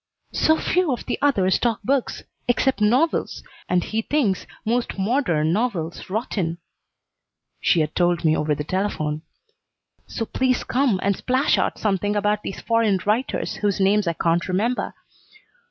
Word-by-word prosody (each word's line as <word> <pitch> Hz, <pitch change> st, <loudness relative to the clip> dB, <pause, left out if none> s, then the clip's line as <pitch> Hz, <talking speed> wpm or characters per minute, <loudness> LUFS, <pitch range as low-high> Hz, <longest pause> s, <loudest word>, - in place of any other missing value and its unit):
"So 315 Hz, 0 st, +3 dB
few 360 Hz, -2 st, +1 dB
of 245 Hz, -, -3 dB
the -, -, -2 dB
others 195 Hz, -10 st, +3 dB
talk 235 Hz, -3 st, 0 dB
books, 270 Hz, -1 st, -1 dB, 0.2 s
except 245 Hz, -1 st, +1 dB
novels, 250 Hz, +10 st, +1 dB, 0.3 s
and 180 Hz, -1 st, +2 dB
he 220 Hz, +1 st, -2 dB
thinks 225 Hz, -7 st, 0 dB, 0.2 s
most 235 Hz, 0 st, -1 dB
modern 190 Hz, -, +1 dB
novels 185 Hz, -8 st, -2 dB
rotten," 190 Hz, -5 st, -2 dB, 1.0 s
she 170 Hz, -, +3 dB
had 155 Hz, 0 st, -2 dB
told 175 Hz, -1 st, +1 dB
me 155 Hz, 0 st, +4 dB
over 150 Hz, -1 st, 0 dB
the 150 Hz, -, -4 dB
telephone. 155 Hz, -4 st, -2 dB, 0.9 s
"So 225 Hz, -, -3 dB
please 255 Hz, +2 st, 0 dB
come 250 Hz, -6 st, +1 dB
and 200 Hz, 0 st, +2 dB
splash 260 Hz, +7 st, +1 dB
out -, -, 0 dB
something 205 Hz, 0 st, 0 dB
about 210 Hz, 0 st, +1 dB
these 195 Hz, -, -6 dB
foreign 230 Hz, -4 st, +2 dB
writers 220 Hz, +6 st, -1 dB
whose 205 Hz, -1 st, 0 dB
names 200 Hz, 0 st, +3 dB
I 170 Hz, -, +1 dB
can't 170 Hz, +1 st, 0 dB
remember. 215 Hz, +7 st, -1 dB
210 Hz, 150 wpm, -23 LUFS, 180-245 Hz, 1.0 s, me